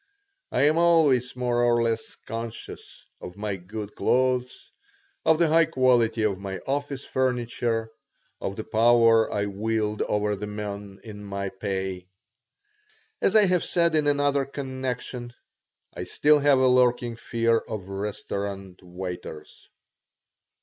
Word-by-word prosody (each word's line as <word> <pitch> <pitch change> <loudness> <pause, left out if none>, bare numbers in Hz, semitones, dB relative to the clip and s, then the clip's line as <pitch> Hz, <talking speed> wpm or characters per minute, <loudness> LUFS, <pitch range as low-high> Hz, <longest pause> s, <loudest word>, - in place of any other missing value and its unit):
I 125 - +2
am 155 +3 +4
always 150 -8 +3
more 125 -1 0
or 120 -1 +3
less 115 -1 -2
conscious 115 0 -7 0.2
of 90 +2 -9
my 105 -1 -3
good 100 +3 -7
clothes, 125 0 0 0.5
of 160 - +5
the 170 0 +3
high 165 +1 +5
quality 120 -5 +2
of 100 -3 0
my 95 -1 -5
office 140 0 -3
furniture, 120 -3 -1 0.5
of 95 - -3
the 110 - -5
power 115 0 +4
I 100 - 0
wield 105 +1 -2
over 105 0 0
the 105 +1 -6
men 105 -1 -6
in 105 -2 -9
my 100 -1 -4
pay. 95 -2 -4 1.1
As 195 - +2
I 215 -1 +7
have 180 -2 +2
said 170 -2 +1
in 155 -2 +2
another 145 -1 +2
connection, 130 -3 -5 0.6
I - - -5
still 150 0 +3
have 145 -1 +4
a 130 0 +4
lurking 125 -1 +3
fear 115 0 +1
of 100 -4 -7
restaurant 100 -1 -5
waiters. 90 -3 -8
115 Hz, 135 wpm, -25 LUFS, 100-130 Hz, 1.1 s, I